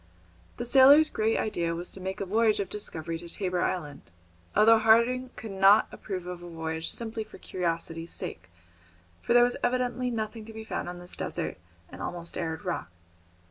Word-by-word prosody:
The 240 - -3
sailor's 275 +5 +7
great 220 +1 +1
idea 170 -5 -1
was 175 +1 -4
to 190 - -10
make 190 +2 -4
a 195 - -2
voyage 215 +2 +2
of 200 - -2
discovery 165 -5 -4
to 170 0 -9
Tabor 180 -1 -2
Island, 150 -6 -2 0.5
although 220 +2 +7
Harding 235 +3 +4
could 220 -3 -7
not 195 +2 +6
approve 185 -4 -6
of 180 -1 -6
a 175 - -9
voyage 160 0 -4
simply 225 -1 -4
for - - -14
curiosity's 165 -2 -3
sake, - - -6 0.7
for - - +1
there 240 - +8
was 245 0 +1
evidently 250 0 0
nothing 220 -1 -4
to 225 - -10
be 220 0 -7
found 220 - -4
on 175 - -7
this 175 0 -8
desert - - -3 0.3
and - - -11
almost 170 -1 -5
arid 165 +2 -4
rock. 175 - -3
200 Hz, 180 wpm, -28 LUFS, 175-225 Hz, 0.7 s, there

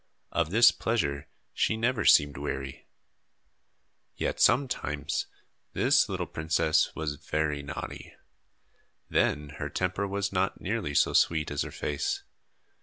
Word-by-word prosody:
Of 85 -2 0
this 115 +5 +7
pleasure 70 -12 -2 0.3
she 110 - +1
never 115 -1 0
seemed 70 0 +5
weary. 70 -1 -5 1.3
Yet - - -2
sometimes 75 - +1 0.5
this - - +3
little - - -2
princess 80 0 +1
was 75 -2 -3
very 75 -2 -1
naughty. 70 - -7 0.9
Then 75 0 +1
her - - -3
temper 95 +2 -1
was 100 0 -2
not 95 +1 0
nearly 95 -8 -3
so - - +3
sweet 80 -2 +2
as 75 - -1
her - - -3
face. 75 0 -3
80 Hz, 120 wpm, -28 LUFS, 75-100 Hz, 1.3 s, this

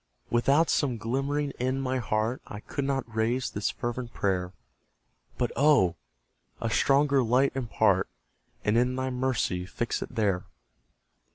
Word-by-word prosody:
Without 140 +7 +3
some 130 -5 +1
glimmering 135 +6 -1
in 130 +2 0
my 130 -1 -1
heart, 110 +1 -1
I 105 - -7
could 140 +4 -4
not 135 -1 0
raise 120 +3 0
this 105 - -1
fervent 120 0 -4
prayer; 90 -2 0 0.9
But, 120 - 0
oh! 135 - +4 0.6
a 115 - -2
stronger 140 +1 +3
light 125 +3 +3
impart, 130 -4 +1 0.6
And 105 +3 +3
in 125 +1 +1
Thy 130 0 -2
mercy 125 -8 -1
fix 120 +5 -2
it - - -7
there. 100 -5 +1
125 Hz, 140 wpm, -28 LUFS, 110-135 Hz, 0.9 s, oh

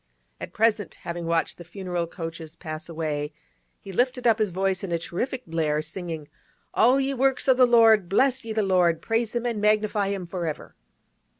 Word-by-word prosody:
At - - -7
present, 220 -2 +1
having 170 -1 -4
watched 165 +1 0
the - - -8
funeral 175 -1 -4
coaches 165 -2 -7
pass 155 -1 -7
away, 155 -2 -3 0.5
he 195 - -10
lifted 250 +5 0
up 225 -1 +4
his 215 -2 +2
voice 190 +1 -1
in 190 - -4
a 170 - +2
terrific 245 +10 -4
blare, 160 -2 0
singing, 160 -2 -6 0.5
'All 255 +3 +4
ye 275 0 0
works 270 0 +1
of 260 -1 +5
the 255 -1 +6
Lord, 225 -6 +5
bless 260 +6 +2
ye 225 - -6
the 215 -1 +1
Lord, 180 -4 +3
praise 225 0 -1
Him 240 0 -1
and 230 -4 -1
magnify 210 -1 +2
Him 195 -2 -3
for 175 -1 -4
ever. 155 - -6
195 Hz, 190 wpm, -25 LUFS, 170-230 Hz, 0.5 s, the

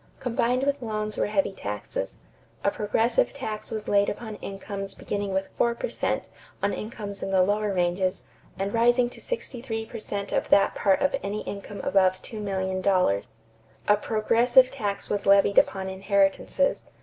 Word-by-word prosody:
Combined 250 +1 0
with 280 0 0
loans 215 -2 -3
were - - 0
heavy 200 -2 +1
taxes. 100 - -4 0.5
A 200 - +3
progressive 225 +4 +1
tax 220 -6 -5
was 215 -1 -5
laid 200 0 +3
upon 220 0 -6
incomes 195 0 -6
beginning 200 -1 -3
with 190 0 -1
four 235 0 +3
per - - -3
cent - - -1 0.4
on 200 - +2
incomes 210 -3 -6
in - - -3
the 190 -1 +4
lower 205 +2 +1
ranges 185 +1 0 0.3
and 195 +1 -2
rising 240 +1 +3
to - - -11
sixty 290 - -4
three 225 -3 -3
per 230 +1 -8
cent 200 -1 -4
of - - 0
that 200 - +5
part 195 -2 +2
of 280 - +2
any 205 +2 -3
income 200 0 -6
above 185 -1 +3
$2,000,000. 190 - 0 0.6
A 210 - +5
progressive 235 +5 +4
tax 205 -7 -3
was 205 -1 -2
levied 200 0 +6
upon 190 -1 0
inheritances. 195 +7 +1
205 Hz, 160 wpm, -26 LUFS, 195-230 Hz, 0.6 s, levied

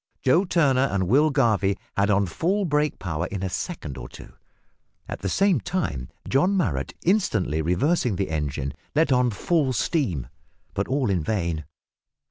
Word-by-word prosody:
Joe 165 +9 +4
Turner 135 -7 +3
and 95 -2 0
Will 145 - +4
Garvie 110 -8 +2 0.2
had 100 +1 +2
on 100 -1 +3
full 185 - 0
brake 150 -2 +1
power 85 -2 -3
in 95 0 -5
a 95 - -1
second 75 - -5
or - - -8
two. - - -12 0.7
At - - -5
the 95 - -2
same 195 - +3
time 80 - -3 0.2
John 180 +9 +2
Marrot 75 - -1
instantly 110 - +1
reversing 105 - +1
the 95 -3 -2
engine, 70 -3 -2 0.2
let 155 -1 +3
on 125 -1 +4
full 135 - 0
steam 110 - 0 0.5
but - - -1
all 130 -5 0
in 90 -3 +1
vain. 85 -5 -2
110 Hz, 160 wpm, -24 LUFS, -, 0.7 s, Joe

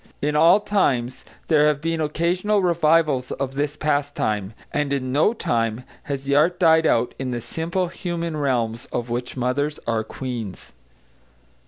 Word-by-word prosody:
In 150 +1 -1
all 165 +6 +6
times 135 - 0 0.2
there 150 -2 +4
have 150 -2 +1
been 165 +1 -2
occasional 180 +7 +1
revivals 155 -6 +2
of 135 -1 -3
this 145 +1 -2
pastime, 145 - -1 0.2
and 145 -1 0
in 130 -2 -1
no 145 +9 +3
time 115 - -1 0.2
has 140 -2 -4
the 140 0 0
art 175 +5 +3
died 160 -2 +5
out 120 +1 +2
in 130 -1 -3
the 120 -1 -2
simple 170 +9 -2
human 170 -2 -4
realms 120 -5 -1
of 120 0 -4
which 125 +2 -3
mothers 145 +4 -1
are 115 -1 0
queens. 115 - -6
145 Hz, 155 wpm, -23 LUFS, 125-165 Hz, 0.2 s, all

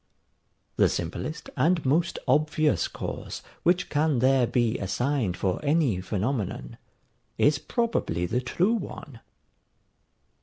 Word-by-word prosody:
The - - +5
simplest 120 - -4
and 165 -1 +2
most 165 +6 +2
obvious 150 +2 +2
cause - - -6 0.2
which 175 +1 +2
can 150 -1 +2
there 130 0 +4
be 120 -1 +1
assigned 110 0 -1
for 95 - -1
any 145 - +2
phenomenon, 100 - -3 0.6
is 145 0 +3
probably 225 - -1
the 120 +8 -1
true 180 - +1
one. 150 - -6
135 Hz, 110 wpm, -26 LUFS, 110-155 Hz, 0.6 s, The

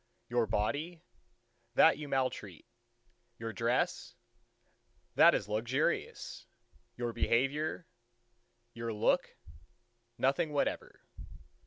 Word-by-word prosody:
Your 120 -2 +1
body? 145 - -2 0.7
That 160 - +6
you 150 - -6
maltreat. 130 - -2 0.7
Your 115 -1 -5
dress? 115 +3 -1 1.0
That - - +7
is 100 - -2
luxurious. 115 +5 -2 0.5
You 120 -1 -2
behavior, 145 +10 0 0.9
your 115 -1 -4
look?—Nothing 120 - -2
whatever. 145 - -2
120 Hz, 75 wpm, -32 LUFS, 115-140 Hz, 1.0 s, That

